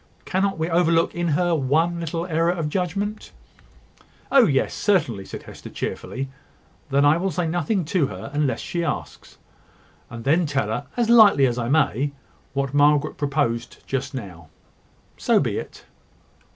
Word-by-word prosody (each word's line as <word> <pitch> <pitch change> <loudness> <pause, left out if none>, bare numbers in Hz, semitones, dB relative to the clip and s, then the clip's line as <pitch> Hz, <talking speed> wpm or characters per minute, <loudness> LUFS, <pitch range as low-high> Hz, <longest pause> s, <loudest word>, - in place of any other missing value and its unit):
Cannot 195 0 0
we 160 0 -1
overlook 165 -1 +2
in 175 0 -2
her 175 +3 +1
one 160 +4 +1
little 165 +1 -3
error 165 -1 +1
of 165 -4 -1
judgment?" 195 +5 -3 1.0
"Oh, 270 -5 +6
yes, 135 -4 +1
certainly," 145 - 0
said - - -8
Hester, - - -11
cheerfully. 135 +1 -4 0.6
"Then 140 +1 +3
I 145 +2 +5
will 190 +3 -1
say 175 0 -2
nothing 175 +3 -1
to 165 -3 +1
her 140 - -8
unless 145 -2 0
she 170 -1 -3
asks; 165 - -5 0.7
and 115 0 -8
then 160 +5 +2
tell 140 -1 -1
her, 145 - -3
as 235 -1 +2
lightly 210 - +7
as 120 -1 0
I 120 0 -2
may, 140 -2 +1 0.4
what 140 -1 -2
Margaret 145 +1 +3
proposed 140 -5 -2
just 135 +1 -3
now. 90 -9 -8 0.7
So - - +3
be - - -1
it." - - -10
155 Hz, 155 wpm, -23 LUFS, 140-175 Hz, 1.0 s, lightly